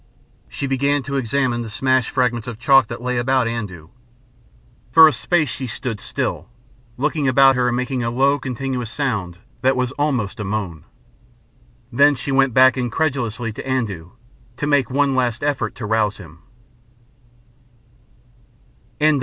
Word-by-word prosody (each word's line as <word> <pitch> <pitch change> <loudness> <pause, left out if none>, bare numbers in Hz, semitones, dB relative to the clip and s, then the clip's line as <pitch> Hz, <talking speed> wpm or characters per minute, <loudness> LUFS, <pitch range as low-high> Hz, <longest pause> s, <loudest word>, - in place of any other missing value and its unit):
She - - -4
began 140 +1 0
to 140 +1 -5
examine 130 -1 0
the 115 - -6
smashed 130 +2 +1
fragments 120 -3 -1
of 120 -3 -6
chalk 130 0 +4
that 120 +1 -7
lay 125 -1 -1
about 130 0 +1
Andoo. 100 -9 -5 1.0
For 160 +4 +9
a 155 - +2
space 145 +6 0
she 130 +2 -5
stood 115 -1 -5
still, - - -4 0.5
looking 150 +1 0
about 135 +1 +5
her 125 0 +1
and 120 0 0
making 125 0 -2
a 115 - -1
low 135 +4 +2
continuous 125 -2 -4
sound 105 -11 -3 0.2
that 130 +1 +2
was 125 -1 -1
almost 125 -10 -1
a - - -3
moan. 95 -6 -4 1.1
Then 145 +4 +4
she 135 +2 -4
went 135 -1 +3
back 130 +2 +5
incredulously 120 -3 -2
to - - -7
Andoo 105 -11 -2 0.5
to 145 - -2
make 145 -3 +2
one 140 +1 +1
last 125 -1 -1
effort 140 -7 -1
to 115 - -6
rouse 105 -1 0
him. 85 -5 -13
125 Hz, 150 wpm, -20 LUFS, 115-135 Hz, 1.1 s, For